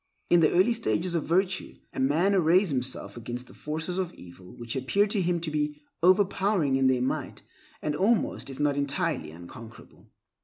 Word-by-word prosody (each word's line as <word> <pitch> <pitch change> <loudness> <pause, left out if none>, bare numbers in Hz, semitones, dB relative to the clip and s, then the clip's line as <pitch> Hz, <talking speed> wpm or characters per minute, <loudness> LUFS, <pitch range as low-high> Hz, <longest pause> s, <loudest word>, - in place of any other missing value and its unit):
In 175 - +7
the 155 - +4
early 190 +7 +4
stages 185 -6 -1
of 165 -3 -1
virtue, 185 +3 0 0.2
a - - -5
man 155 +9 +2
arrays 180 0 +4
himself 130 -1 -3
against 120 +1 -5
the - - -15
forces 160 +4 -4
of 180 -2 -2
evil 90 +1 -13
which 120 +1 -5
appear 140 +11 +2
to 205 -1 -1
him 175 -1 +1
to 160 -2 -3
be 150 0 -2 0.2
overpowering 185 -4 +3
in 135 0 +3
their 130 -1 +2
might, 130 - -3 0.4
and 150 -1 -1
almost, 205 -2 +1
if 135 - -9
not 145 -1 +2
entirely, 145 - -1
unconquerable. 85 +8 -13
155 Hz, 180 wpm, -27 LUFS, 130-185 Hz, 0.4 s, In